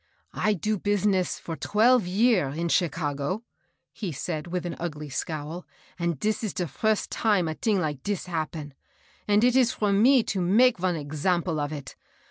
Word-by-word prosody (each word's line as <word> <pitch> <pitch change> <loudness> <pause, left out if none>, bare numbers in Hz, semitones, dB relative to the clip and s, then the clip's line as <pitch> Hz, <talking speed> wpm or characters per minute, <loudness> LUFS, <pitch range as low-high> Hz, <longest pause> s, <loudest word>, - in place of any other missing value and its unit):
" - - -43
I 210 - +4
do 210 +3 -1
business 200 -2 +1
for 165 - -6
twelve 225 +3 +3
year 195 - +3
in 165 +5 -3
Chicago,*' 155 +3 -1 0.5
he 200 -6 -4
said, 155 +2 -4
with 180 0 -3
an 175 - -4
ugly 150 -3 -5
scowl, 155 +5 -5 0.3
"and 170 -4 -1
dis 215 +5 0
de 180 - -2
first 215 - -1
time 205 -6 +2
a 160 - -2
ting 210 +4 0
like 150 -6 -2
dis' 205 +3 -3
happen; 155 -4 -4 0.5
and 210 +1 +4
it 250 0 +4
is 255 -2 +4
for 205 -2 0
me 245 +5 +5
to 195 -3 -2
make 220 +6 +4
von 180 -1 0
example 160 +3 -1
of 145 0 -2
it. 145 -3 -7
180 Hz, 175 wpm, -26 LUFS, 155-210 Hz, 0.5 s, me